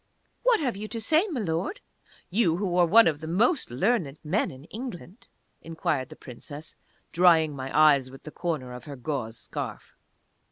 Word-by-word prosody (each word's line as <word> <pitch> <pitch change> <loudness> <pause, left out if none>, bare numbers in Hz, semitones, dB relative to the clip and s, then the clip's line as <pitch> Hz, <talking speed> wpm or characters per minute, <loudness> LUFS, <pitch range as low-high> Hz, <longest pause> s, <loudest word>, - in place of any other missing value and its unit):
"What - - +4
have 255 -8 -1
you 210 +2 -6
to 230 - -4
say, 315 - +2
Milord? 205 - -2 0.5
You, 180 -5 +2
who 185 -2 -1
are 175 -1 +5
one 225 +7 +7
of 150 -3 0
the 160 - -7
most 230 - +2
learned 155 - 0
men 185 +8 +1
in 130 +1 -12
England?" 205 - -9 0.3
inquired 155 -5 -2
the - - -11
Princess, 145 +5 -10 0.4
drying 165 -4 +4
my 135 0 -5
eyes 140 -4 +5
with 135 +1 -13
the 155 - -8
corner 150 -9 -3
of 125 - -9
her 145 -2 -7
gauze 125 -4 -4
scarf. - - -7
165 Hz, 170 wpm, -27 LUFS, 140-215 Hz, 0.5 s, one